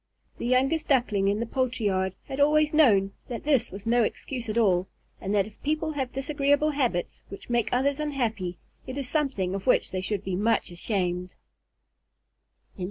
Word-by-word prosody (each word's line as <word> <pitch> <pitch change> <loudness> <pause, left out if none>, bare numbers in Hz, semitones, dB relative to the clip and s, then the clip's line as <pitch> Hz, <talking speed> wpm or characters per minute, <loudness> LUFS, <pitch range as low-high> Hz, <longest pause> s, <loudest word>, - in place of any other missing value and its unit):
The - - -2
youngest 270 +6 +2
Duckling 225 -8 +2
in 200 +1 +1
the 230 - -1
poultry 255 -1 -1
yard 190 -1 0
had 270 0 -5
always 300 +1 +4
known 200 -11 +4
that 235 -2 -5
this 275 -5 +2
was 195 +3 -9
no 240 +1 +3
excuse 240 +1 -3
at 215 - -2
all, 190 -5 +3 0.3
and 195 - -3
that 200 -2 +3
if 215 0 -14
people 310 +2 -1
have 265 -4 -3
disagreeable 285 +2 +1
habits 245 -11 -1
which 200 +4 -9
make 240 -2 +1
others 275 +3 +1
unhappy, 225 -12 -2 0.3
it 260 +1 -5
is 275 -3 -3
something 260 - 0
of 195 +3 -5
which - - +3
they 185 - -2
should 200 0 -2
be 190 -2 -2
much 210 0 +1
ashamed. 180 -1 -2
235 Hz, 175 wpm, -27 LUFS, 195-280 Hz, 0.3 s, always